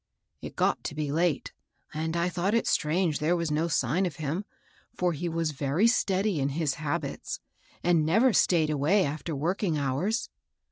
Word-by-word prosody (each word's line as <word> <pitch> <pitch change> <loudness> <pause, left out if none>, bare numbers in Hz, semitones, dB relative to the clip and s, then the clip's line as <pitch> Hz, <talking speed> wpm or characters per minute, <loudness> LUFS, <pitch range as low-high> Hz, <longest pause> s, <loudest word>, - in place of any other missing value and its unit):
It - - -8
got - - +1
to - - -4
be 150 -2 -2
late, 165 -1 0 0.4
and 160 +2 -2
I 170 +1 +1
thought 180 +4 0
it 230 - +2
strange 165 0 +1
there 160 +4 +2
was 170 -3 -1
no 155 +3 +1
sign 165 +4 +1
of 160 - -6
him, 155 +7 -3 0.5
for 180 -1 +1
he 170 +3 -3
was 165 -1 -1
very 145 +7 +1
steady 200 -5 +2
in 135 0 +1
his 155 -4 +1
habits, 150 -2 -3 0.4
and 170 -3 +3
never 225 +11 +4
stayed 160 -6 +3
away 160 +7 +3
after 155 +2 -4
working 170 +3 0
hours. 145 - -1
165 Hz, 175 wpm, -28 LUFS, 150-180 Hz, 0.5 s, never